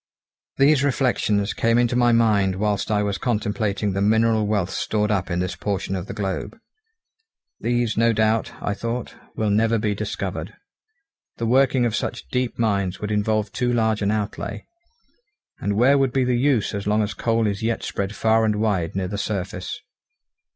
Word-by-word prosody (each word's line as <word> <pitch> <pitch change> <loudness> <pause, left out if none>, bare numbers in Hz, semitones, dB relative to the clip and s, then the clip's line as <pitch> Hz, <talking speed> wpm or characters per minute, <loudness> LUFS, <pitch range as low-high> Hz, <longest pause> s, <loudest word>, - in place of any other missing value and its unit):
These 140 0 +4
reflections 120 -7 +1
came 115 +1 +2
into 120 0 +2
my 120 -1 +4
mind 105 -5 +3
whilst 105 0 -1
I 105 -1 +2
was 100 -1 -2
contemplating 105 -3 -1
the 100 - -1
mineral 110 +1 +3
wealth 100 -4 0
stored 105 0 -1
up 95 -2 0
in 85 - -1
this 90 +1 -2
portion 100 -1 -2
of 95 +1 -5
the - - -5
globe. 95 -3 -3 1.0
These 120 -2 0
no 115 +1 +4
doubt, 110 0 +1
I 100 - -1
thought, 115 +4 -4 0.2
will 110 -2 0
never 115 +2 +3
be 105 -1 0
discovered; 100 - -4 0.8
the 115 - -2
working 130 +1 +3
of 115 -2 0
such 120 - -4
deep 125 -1 -1
mines 100 -5 0
would 105 0 -4
involve 105 0 0
too 125 -1 0
large 110 -2 +1
an 100 - +1
outlay, 105 0 -3 0.9
and 100 +1 -1
where 135 +5 +5
would 135 -2 +1
be 135 - +2
the 125 0 +1
use 125 -3 +1
as 100 0 -4
long 105 +1 +2
as 105 - -3
coal 115 -1 0
is 100 -2 -1
yet 115 0 -1
spread 100 +1 -3
far 110 +1 +3
and 110 -1 +2
wide 100 -6 0
near 95 -1 -1
the 100 +2 -4
surface? 95 -3 -4
110 Hz, 180 wpm, -23 LUFS, 100-115 Hz, 1.0 s, where